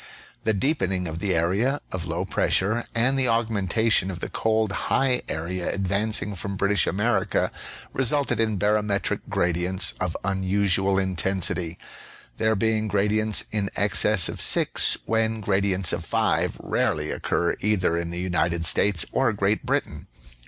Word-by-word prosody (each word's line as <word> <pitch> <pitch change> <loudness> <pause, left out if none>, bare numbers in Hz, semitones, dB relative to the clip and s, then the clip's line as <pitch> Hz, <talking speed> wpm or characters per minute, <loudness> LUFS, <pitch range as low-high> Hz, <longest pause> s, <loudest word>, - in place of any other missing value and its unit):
The 110 - +2
deepening 95 - 0
of 80 +1 -5
the 100 -1 0
area 100 - +1
of 90 -2 -4
low 85 0 -2
pressure 110 +5 +1
and 130 +4 +2
the 130 - +3
augmenta 110 -2 0
tion 95 -2 +3
of 90 -2 -6
the - - -5
cold 110 -2 +1 0.2
high 130 -2 +2
area 85 +3 -3
advancing 100 +2 -1
from 100 +1 -5
British 100 +1 +2
America 105 +1 0 0.4
resulted 135 -2 +1
in 110 -2 +1
barometric 105 0 0
gradients 90 +2 0
of 90 -3 -2
unusual 95 0 +1
intensity; 90 -2 -1 0.6
there 110 0 +1
be 110 +2 +1
ing 110 - -3
gradients 105 +1 +1
in 105 -2 -1
excess 100 -1 +3
of - - -3
6, - - +3
when 110 0 0
gradients 95 -3 +1
of - - -3
5 - - 0
rarely 75 0 -1
occur 85 - -1
either 95 -5 +1
in 85 0 -2
the 85 - -5
United 85 -2 -1
States 85 0 +1
or 130 -3 +2
Great 100 +1 -1
Britain. - - -2
100 Hz, 145 wpm, -24 LUFS, 90-110 Hz, 0.6 s, the